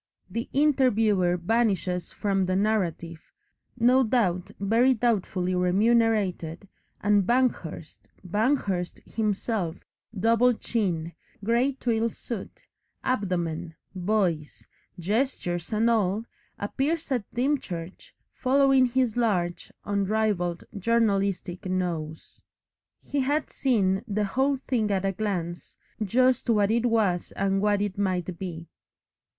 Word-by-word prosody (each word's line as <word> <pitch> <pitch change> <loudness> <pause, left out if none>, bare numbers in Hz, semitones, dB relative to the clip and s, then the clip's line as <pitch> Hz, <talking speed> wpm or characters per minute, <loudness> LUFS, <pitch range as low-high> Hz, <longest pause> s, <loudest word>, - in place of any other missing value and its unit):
The 230 +1 -3
interviewer 225 -11 +3
vanishes 185 -2 0
from 195 -2 0
the 185 - 0
narrative, 185 -5 -1 0.6
no 250 +3 +5
doubt 215 -8 +1
very 230 +6 +3
doubtfully 195 -6 0
remunerated, 195 -2 +1 0.3
and 205 -1 +3
Banghurst, 235 -11 -1 0.2
Banghurst 205 -3 0
himself, 210 -4 -1 0.4
double 230 +4 +4
chin, 175 -9 -2 0.3
grey 240 +6 +2
twill 230 -3 0
suit, 225 -3 -8 0.4
abdomen, 175 -8 -2 0.2
voice, 180 -5 -1 0.3
gestures 180 -3 -1
and 220 +1 +2
all, 215 -1 +1 0.3
appears 285 +9 -2
at 245 -6 -2
Dymchurch, 220 - -3 0.2
following 270 0 +4
his 245 -2 0
large, 180 -8 0
unrivalled 200 -3 0 0.2
journalistic 195 -4 0
nose. 170 -4 -4 0.6
He 285 - -3
had 290 +3 0
seen 195 -8 +1
the 210 0 0
whole 270 +7 +1
thing 225 -5 +1
at 195 -1 0
a 195 - +2
glance, 175 -5 -4 0.3
just 255 +5 +2
what 210 -2 +3
it 235 +1 +2
was 210 -7 +1
and 195 0 0
what 205 -1 +2
it 200 -1 -4
might 185 -3 -1
be. 170 -3 -6
205 Hz, 105 wpm, -26 LUFS, 180-235 Hz, 0.6 s, no